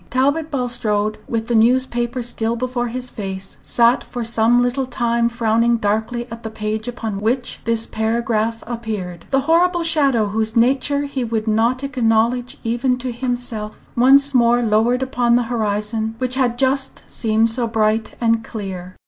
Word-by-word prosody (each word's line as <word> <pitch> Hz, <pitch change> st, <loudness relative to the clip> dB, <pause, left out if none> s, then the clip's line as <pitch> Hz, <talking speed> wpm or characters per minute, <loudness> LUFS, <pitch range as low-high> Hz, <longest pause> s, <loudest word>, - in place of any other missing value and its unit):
Talbot 285 Hz, +5 st, +1 dB
Bulstrode, 220 Hz, -6 st, -1 dB
with 225 Hz, -1 st, -2 dB
the 240 Hz, -, -1 dB
newspaper 240 Hz, +1 st, +2 dB
still 230 Hz, -1 st, -1 dB
before 245 Hz, 0 st, -2 dB
his 250 Hz, +1 st, -6 dB
face, 195 Hz, -2 st, -6 dB
sat 235 Hz, +1 st, +2 dB
for 245 Hz, -2 st, -5 dB
some 230 Hz, +1 st, +3 dB
little 255 Hz, +2 st, -1 dB
time 235 Hz, -1 st, 0 dB
frowning 235 Hz, 0 st, +2 dB
darkly 220 Hz, +3 st, -1 dB
at 230 Hz, 0 st, -7 dB
the 220 Hz, -, -5 dB
page 215 Hz, +1 st, -4 dB
upon 225 Hz, -5 st, -4 dB
which 245 Hz, +4 st, -1 dB
this 230 Hz, 0 st, +1 dB
paragraph 225 Hz, 0 st, -1 dB
appeared. 215 Hz, -7 st, -5 dB
The 270 Hz, -1 st, +2 dB
horrible 340 Hz, +4 st, +2 dB
shadow, 275 Hz, -10 st, +2 dB
whose 220 Hz, +2 st, -1 dB
nature 270 Hz, +4 st, +2 dB
he 280 Hz, -3 st, -3 dB
would 225 Hz, -1 st, -2 dB
not 230 Hz, +4 st, +1 dB
acknowledge 245 Hz, -1 st, +1 dB
even 240 Hz, +2 st, 0 dB
to 250 Hz, 0 st, -4 dB
himself, 240 Hz, -3 st, -4 dB, 0.2 s
once 275 Hz, +3 st, +5 dB
more 240 Hz, -1 st, +4 dB
lowered 230 Hz, +4 st, +2 dB
upon 245 Hz, -2 st, +1 dB
the 245 Hz, -, +3 dB
horizon 220 Hz, 0 st, -1 dB
which 255 Hz, 0 st, -1 dB
had 255 Hz, -2 st, +1 dB
just 270 Hz, +1 st, 0 dB
seemed 225 Hz, 0 st, +1 dB
so 235 Hz, 0 st, 0 dB
bright 220 Hz, 0 st, 0 dB
and 230 Hz, -1 st, +1 dB
clear. 185 Hz, -5 st, -7 dB
235 Hz, 155 wpm, -20 LUFS, 220-250 Hz, 0.2 s, once